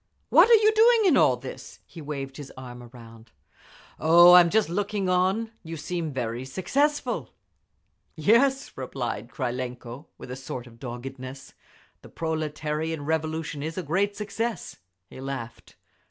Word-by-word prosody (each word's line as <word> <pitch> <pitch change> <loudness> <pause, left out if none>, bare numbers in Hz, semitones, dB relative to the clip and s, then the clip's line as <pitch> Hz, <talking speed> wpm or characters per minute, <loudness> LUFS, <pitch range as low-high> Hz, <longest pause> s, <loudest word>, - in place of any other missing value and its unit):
"What - - +7
are 470 - +9
you 435 0 +4
doing 455 +1 +5
in 345 -7 +5
all 125 - +4
this?" 130 +1 -9
He 165 - -12
waved 140 -2 -6
his 145 -2 -9
arm 125 -1 -9
around. 115 -2 -14 0.7
"Oh, 175 +3 +7
I'am 175 -1 +8
just 220 +3 +2
looking 200 +2 -2
on…. 190 +5 +1
You 165 0 -7
seem 165 +1 -4
very 120 -2 -3
successful." 265 - -1 0.8
"Yes," 250 - +3
replied 125 -3 -5
Krylenko, 125 +2 -5
with - - -10
a - - -4
sort 130 -2 -7
of 115 -1 -16
doggedness, 130 +2 -8 0.5
"The - - -14
proletarian 155 -1 -3
Revolution 160 -1 -2
is 160 +3 -5
a 185 - -2
great 195 +6 0
success." 220 - -4 0.3
He 130 - -11
laughed. 130 -4 -7
155 Hz, 140 wpm, -26 LUFS, 130-190 Hz, 0.8 s, are